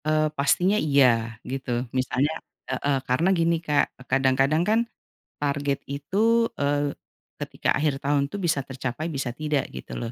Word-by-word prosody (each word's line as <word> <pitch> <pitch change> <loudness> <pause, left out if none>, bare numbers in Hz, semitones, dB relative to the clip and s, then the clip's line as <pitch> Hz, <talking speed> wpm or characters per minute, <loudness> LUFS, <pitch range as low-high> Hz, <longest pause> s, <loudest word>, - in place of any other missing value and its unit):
Eee, 155 0 +2
pastinya 175 +8 +3
iya, 140 -3 +4 0.5
gitu. 135 -1 -5 0.3
Misalnya 130 +3 +1 0.4
heeh, 135 +2 0
karena 145 +9 +2
gini 170 0 +3
Kak 150 -2 +3 0.2
kadang-kadang 135 +4 +3
kan 220 +1 +4 0.6
target 140 -1 0
itu, 220 +11 +2
eee, 145 0 0 0.5
ketika - - -3
akhir 150 -1 +1
tahun 140 0 +1
tuh 205 - -4
bisa 155 -5 +1
tercapai 135 +4 -4
bisa 135 -4 -2
tidak 150 -2 -1
gitu 65 - -8
loh. 115 -1 -4
145 Hz, 140 wpm, -25 LUFS, 135-155 Hz, 0.6 s, iya